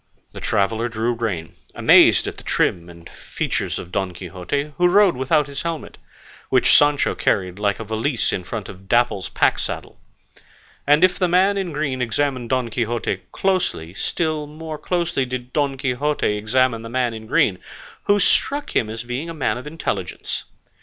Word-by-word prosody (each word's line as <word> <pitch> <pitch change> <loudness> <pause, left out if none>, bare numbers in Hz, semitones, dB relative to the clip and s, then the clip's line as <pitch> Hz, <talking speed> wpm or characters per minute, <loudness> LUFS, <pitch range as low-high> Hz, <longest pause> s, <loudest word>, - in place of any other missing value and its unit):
The - - -8
traveller 110 +3 0
drew 115 +2 -1
rein, 105 -9 -3 0.2
amazed - - +6
at - - -5
the - - -11
trim 85 0 0
and 85 0 -13
features - - -3
of 90 - -8
Don 95 -1 -2
Quixote, 95 - -4
who 180 - +4
rode 195 0 +5
without 140 +4 +2
his 140 -1 -6
helmet, 165 -2 -5 0.5
which - - +5
Sancho 145 -1 +4
carried 95 0 0
like 100 -1 0
a - - -4
valise 110 +4 -1
in 90 - -2
front 100 +3 -5
of 95 0 -12
Dapple's 120 -5 +2
pack - - +2
saddle; - - -5 0.9
and 150 +4 +5
if 185 -1 +4
the 180 - +3
man 185 +3 +3
in 190 -3 -2
green 145 -4 -2
examined 125 0 -1
Don 130 -2 0
Quixote 120 0 -2
closely, 180 - -1
still 155 - -2
more 155 0 -7
closely 175 -6 0
did 125 0 -5
Don 140 -2 0
Quixote 130 -2 0
examine 115 +2 +1
the 115 - -8
man 125 -1 0
in 110 0 -8
green, 95 -4 +2 0.5
who 205 0 +4
struck 285 +8 +1
him 110 - +2
as 115 +1 -5
being 125 +7 -4
a 165 - -6
man 145 - 0
of 130 - -9
intelligence. 160 +2 -4
125 Hz, 175 wpm, -21 LUFS, 110-150 Hz, 0.9 s, amazed